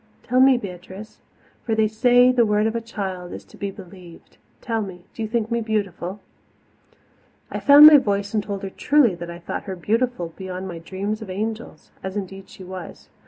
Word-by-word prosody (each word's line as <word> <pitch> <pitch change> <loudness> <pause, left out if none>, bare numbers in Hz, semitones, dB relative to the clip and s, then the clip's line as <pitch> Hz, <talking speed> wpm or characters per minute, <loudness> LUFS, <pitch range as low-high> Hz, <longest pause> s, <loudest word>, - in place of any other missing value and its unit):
"Tell 250 +1 +1
me, 265 +1 +7
little 200 -7 -4
Beatrice 190 +4 -12 0.4
for 225 - -1
they 220 0 +3
say 245 +3 +4
the 250 -2 +3
word 210 -1 +2
of 225 +1 -1
a 230 - -1
child 190 -6 -6
is - - -9
to - - -18
be 200 - -4
believed 180 -3 -14 0.2
tell 225 -3 -2
me, 185 -4 -8
do - - -8
you 220 - -1
think 225 0 -2
me 235 0 0
beautiful?" 205 -3 -3 1.3
I - - -3
found 285 +1 +9
my 305 -1 +11
voice 200 -4 -2
and 215 - +1
told 200 -1 -6
her 195 - -5
truly 285 -5 +3
that 175 0 -8
I 170 - -7
thought 175 - -6
her 190 -2 -5
beautiful 210 -1 -1
beyond 185 0 -6
my 170 -2 -7
dreams 200 +6 -4
of 215 - -8
angels 220 +4 -5
as 190 +1 -5
indeed 195 -1 -7
she 190 - -12
was. 185 -1 -9
205 Hz, 205 wpm, -22 LUFS, 185-230 Hz, 1.3 s, my